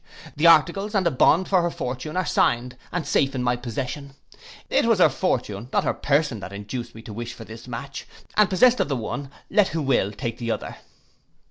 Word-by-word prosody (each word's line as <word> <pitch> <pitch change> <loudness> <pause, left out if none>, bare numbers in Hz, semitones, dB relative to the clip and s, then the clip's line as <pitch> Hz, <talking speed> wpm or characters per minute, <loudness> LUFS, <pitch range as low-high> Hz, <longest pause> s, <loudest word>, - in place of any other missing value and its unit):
The 155 +4 +4
articles, 180 +6 +4
and 190 -2 +2
a 170 - +3
bond 170 +7 +4
for 185 -2 +3
her 175 - 0
fortune, 135 +2 -5
are 185 - +1
signed, 125 -3 +1 0.2
and 175 -2 -2
safe 135 0 +1
in 125 - -1
my 120 0 +2
possession. 130 +3 -5 0.5
It - - +2
was - - +4
her - - +6
fortune, 105 +4 -2
not - - +2
her - - 0
person, 145 -5 0
that 95 - -8
induced 105 +5 -6
me 110 - -11
to 110 - -9
wish 120 +2 -5
for 115 - -9
this 115 +2 -11
match, 125 +3 -7 0.3
and 210 -2 +4
possessed 245 +7 +4
of - - +1
the 140 - 0
one, 135 +5 -5 0.2
let 210 -2 +4
who 165 - -3
will 125 -7 +1
take 115 +3 -5
the 120 -1 -3
other. - - -3
135 Hz, 215 wpm, -24 LUFS, 120-170 Hz, 0.5 s, her